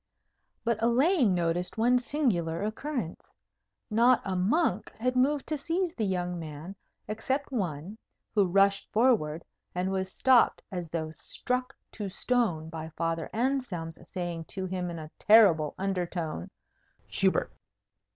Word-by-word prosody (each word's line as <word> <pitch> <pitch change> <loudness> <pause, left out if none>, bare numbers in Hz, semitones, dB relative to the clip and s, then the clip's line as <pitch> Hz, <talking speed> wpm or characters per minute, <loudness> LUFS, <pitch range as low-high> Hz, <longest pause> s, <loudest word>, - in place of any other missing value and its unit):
But 230 -2 0
Elaine 245 - +3
noticed 175 +2 0
one 245 +3 +4
singular 215 - 0
occurrence. 220 - -4 0.6
Not 235 +3 +5
a 190 -1 -1
monk 205 - +1
had 255 +3 0
moved 275 +3 +2
to 305 -2 -2
seize 340 +3 -1
the 220 -4 -1
young 180 -2 -2
man, 160 +4 -7 0.3
except 265 +7 -2
one, 190 - -3 0.3
who 205 -3 +4
rushed 195 +2 +3
forward, 210 -10 +2 0.3
and 180 +1 0
was 190 -1 -2
stopped, 260 +2 +4
as 175 -3 -4
though 160 -1 -3
struck 250 +10 -3 0.2
to 205 -3 -5
stone, 190 -7 0
by 160 0 -6
Father 165 -1 -1
Anselm's 225 -10 -2
saying 175 -3 -4
to 190 +2 -5
him 180 -1 -3
in 170 - -5
a 155 -1 -8
terrible 190 -9 +5
undertone, 175 - -3 0.6
"Hubert!" - - +1
195 Hz, 130 wpm, -29 LUFS, 170-245 Hz, 0.6 s, Not